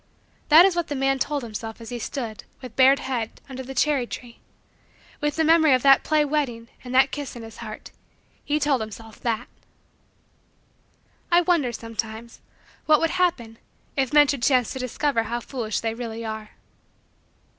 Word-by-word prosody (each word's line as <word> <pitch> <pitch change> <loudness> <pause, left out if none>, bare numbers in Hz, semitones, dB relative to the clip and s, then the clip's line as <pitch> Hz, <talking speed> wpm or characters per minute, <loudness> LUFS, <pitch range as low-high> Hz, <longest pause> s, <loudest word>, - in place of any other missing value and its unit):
That 320 +4 +9
is 385 -3 +2
what 345 -2 -1
the 290 - -3
man 270 0 +1
told 290 0 -1
himself 225 0 -7
as 230 - -9
he 245 -1 -5
stood, 230 -2 -5 0.2
with 250 -3 -10
bared 265 +1 +6
head, 245 -5 -4
under 260 -1 -7
the 265 +1 -8
cherry 270 -2 +1
tree. 235 -1 -9 0.8
With 295 0 -1
the 320 - +2
memory 315 -3 +5
of 255 - -2
that 275 -1 +6
play 305 -1 +2
wedding 260 -6 -2
and 250 - -8
that 265 +1 +5
kiss 290 -3 -5
in 235 - -8
his 225 -1 -11
heart, 215 -2 -9 0.5
he 295 +1 0
told 285 -4 +1
himself 220 0 -9
that! 235 0 -2 1.8
I 345 +1 +6
wonder, 335 -8 +1
sometimes, 225 0 -6 0.5
what 305 -1 +6
would 330 - +1
happen 265 -12 -1 0.4
if 270 -2 0
men 295 0 +7
should 275 -3 -1
chance 250 -2 +2
to 260 - -6
discover 255 0 0
how 235 +2 -3
foolish 235 -3 -4
they 225 -1 -2
really 230 -1 -6
are. 220 -1 -6
255 Hz, 175 wpm, -24 LUFS, 230-290 Hz, 1.8 s, That